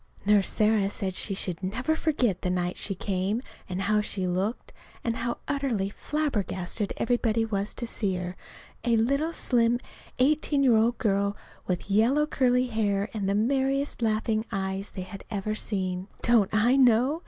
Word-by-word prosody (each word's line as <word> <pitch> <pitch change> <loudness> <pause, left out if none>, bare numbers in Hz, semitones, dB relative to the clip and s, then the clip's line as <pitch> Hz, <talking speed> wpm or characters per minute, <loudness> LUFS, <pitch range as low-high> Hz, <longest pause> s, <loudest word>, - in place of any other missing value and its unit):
Nurse 205 -1 +4
Sarah 215 -2 +2
said 195 -2 -2
she 195 +2 -2
should 180 -3 -3
never 255 +11 -1
forget 255 - 0
the 180 - -1
night 180 0 -1
she 195 - -2
came, 195 +3 -1 0.3
and 185 +1 -2
how 210 +1 +2
she 200 -2 -2
looked, 190 +6 -2 0.3
and 230 -1 -1
how 235 +1 -2
utterly 255 -9 -1
flabbergasted 210 -8 -2
everybody 230 -2 +1
was 205 -2 -2
to 240 - -3
see 205 -4 -1
her 180 0 -4 0.5
a 235 -2 +3
little 280 +8 +1
slim 240 -6 +2 0.4
eighteen 290 +1 +2
year 250 -4 +5
old 230 +2 +3
girl 200 -2 0 0.3
with 180 0 -2
yellow 245 +9 +4
curly 255 -3 +2
hair 210 -3 0
and 200 -3 -1
the 200 - +1
merriest 270 +5 +1
laughing 220 0 +1
eyes 195 0 -2
they 185 - -6
had 190 +1 -9
ever 210 +1 -2
seen. 185 -3 -2 0.2
(Don't 230 -5 +4
I 230 +5 +3
know? 255 +4 +4
215 Hz, 165 wpm, -27 LUFS, 195-245 Hz, 0.5 s, year